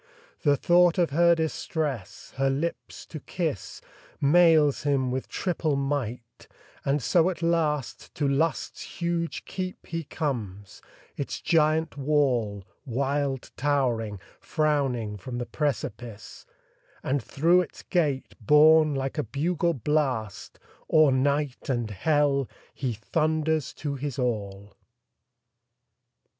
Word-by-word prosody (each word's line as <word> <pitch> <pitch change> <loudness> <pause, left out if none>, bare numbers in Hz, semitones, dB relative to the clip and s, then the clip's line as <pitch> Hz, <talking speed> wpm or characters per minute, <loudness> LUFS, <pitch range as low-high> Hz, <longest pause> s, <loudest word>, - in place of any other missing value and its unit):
The 145 -2 +3
thought 175 +4 +4
of 170 -5 +2
her 170 +3 +5
distress, 155 - -3
her 135 0 +2
lips 150 +5 -4
to 155 - -8
kiss, 155 - -4 0.4
Mails 155 -1 +5
him 135 -3 +1
with 130 +1 -3
triple 165 -5 -1
might; 130 -4 -3 0.4
and 140 -1 0
so 170 +5 +3
at 175 -2 -5
last 155 -5 -1
To 145 - 0
Lust's 150 +4 -1
huge 170 -1 -2
keep 185 -1 -5
he 165 0 -4
comes; 110 - -4 0.4
its 140 - -4
giant 160 -1 +2
wall, 130 -9 +1 0.2
Wild 135 +1 -2
towering, 120 -7 0 0.2
frowning 135 -9 0
from 120 +6 -6
the 120 - -3
precipice; 115 - -4 0.6
And 135 +1 0
through 170 +9 +3
its 170 - -8
gate, 150 -7 0
borne 155 +4 +6
like 135 +3 -2
a - - +1
bugle 170 +4 0
blast, 130 -5 -1 0.3
O'er 155 -3 +6
night 140 +1 0
and 120 -4 -1
hell 140 +5 +1 0.2
he 130 -4 -2
thunders 155 +5 0
to 145 -2 -4
his 140 -1 -4
all. 100 -5 -3
145 Hz, 115 wpm, -26 LUFS, 125-160 Hz, 0.6 s, borne